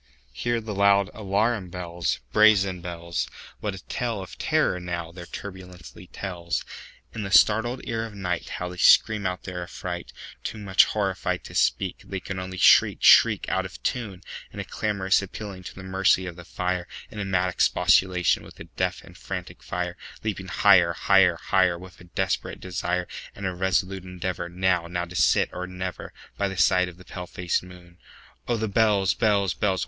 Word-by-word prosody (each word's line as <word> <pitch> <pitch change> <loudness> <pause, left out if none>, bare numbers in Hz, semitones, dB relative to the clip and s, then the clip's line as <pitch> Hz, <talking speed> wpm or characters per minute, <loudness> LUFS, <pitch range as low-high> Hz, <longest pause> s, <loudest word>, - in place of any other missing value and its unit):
Hear 120 - -1
the 110 -1 -5
loud 100 0 +3
alarum 105 -1 0
bells, 85 -1 -3
Brazen 100 -4 +4
bells! 85 -1 -4 0.3
What 105 -2 -3
a 95 - -11
tale 120 -4 -2
of 95 - -8
terror, 155 -12 +1
now, 85 -2 -4
their 85 0 -10
turbulency 90 -2 -10
tells! 85 -3 -4 0.5
In 115 - -4
the 100 - -4
startled 110 +5 +4
ear 115 -1 -2
of 110 - -13
nightHow 90 -2 -3
they 90 - -9
scream 105 +3 +5
out 90 0 -4
their 90 -2 -5
affright! 85 - -6 0.3
Too - - -4
much 100 -2 +4
horrified 95 -3 -2
to - - -11
speak, 95 -2 +1
They 95 - -5
can 95 0 -5
only 95 0 -6
shriek, - - +5
shriek, - - +7
Out - - 0
of - - -8
tune, 105 -7 -3 0.3
In - - -9
a - - -2
clamorous 100 -3 +1
appealing 100 -1 -7
to 95 - -8
the 95 - -9
mercy 95 0 +2
of 90 -2 -6
the 85 0 -11
fire, 90 0 -2 0.2
In 110 - -8
a - - -1
mad 95 -1 +1
expostulation 90 0 +3
with - - -13
the - - -10
deaf - - -1
and - - -15
frantic - - -7
fire, 90 0 -4 0.3
Leaping 100 -3 -3
higher, 90 -4 +5
higher, 95 0 +4
higher, 95 0 +2
With 90 0 -13
a - - -13
desperate 95 +1 -2
desire, 90 0 -2 0.3
And 100 - -6
a 95 - -1
resolute 95 +1 0
endeavorNow—now 90 -1 -2
to 90 +1 -11
sit 70 -7 +3
or 90 0 -4
never, 90 0 -6 0.3
By 100 - +2
the 95 -1 -6
side 90 0 +3
of 90 - -14
the 90 - -15
pale 90 0 -7
faced 90 0 -1
moon. 90 -1 -15 0.5
Oh, 120 - +1
the 110 0 -1
bells, 100 -3 +3
bells, 100 -4 +2
bells! 95 -3 0
95 Hz, 180 wpm, -25 LUFS, 90-100 Hz, 0.5 s, shriek